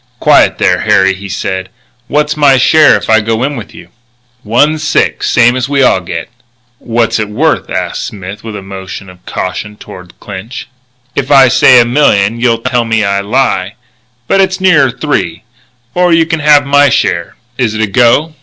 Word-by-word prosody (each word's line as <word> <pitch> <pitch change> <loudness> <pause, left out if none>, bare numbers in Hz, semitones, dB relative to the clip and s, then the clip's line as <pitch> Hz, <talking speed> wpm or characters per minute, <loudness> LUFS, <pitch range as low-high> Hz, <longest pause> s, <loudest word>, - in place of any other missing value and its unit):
"Quiet - - +3
there, - - +1
Harry," 95 0 +2
he 100 +1 -9
said. 95 0 -4 0.4
"What's 150 +1 -1
my 145 -3 +3
share 155 +3 +4
if - - -8
I 110 0 +3
go 115 +2 -2
in 140 +2 -2
with 115 -5 -9
you?" - - -13 0.5
"One 145 +8 +1
sixth, 160 +1 -1
same's 120 +2 +2
we 140 -1 +1
all 95 - +3
get." 85 -2 -6 0.5
"What's 115 -1 -1
it 105 -1 -3
worth?" 105 - -1
asked - - -4
Smith, 95 0 -9
with 110 -2 -7
a 100 - -8
motion 95 -1 -9
of 90 0 -20
caution 105 +3 -5
toward 90 -3 -13
Clinch. 100 +5 -9 0.5
"If 135 -1 -2
I 135 -3 +6
say 130 0 +5
a 120 - +4
million 115 -5 +1
you'll 115 -1 0
tell 120 -2 0
me 115 -1 0
I 100 0 0
lie. 100 -3 -1 0.5
But 195 - +2
it's 190 0 -1
nearer 165 -8 +3
three 110 - -3 0.5
or 180 0 +1
you 165 -1 +3
can 165 0 -2
have 150 -1 +4
my 145 +1 +3
share. 85 -7 -1 0.2
Is 115 -4 0
it 110 - -2
a - - +2
go?" 120 +9 +1
115 Hz, 180 wpm, -11 LUFS, 100-145 Hz, 0.5 s, I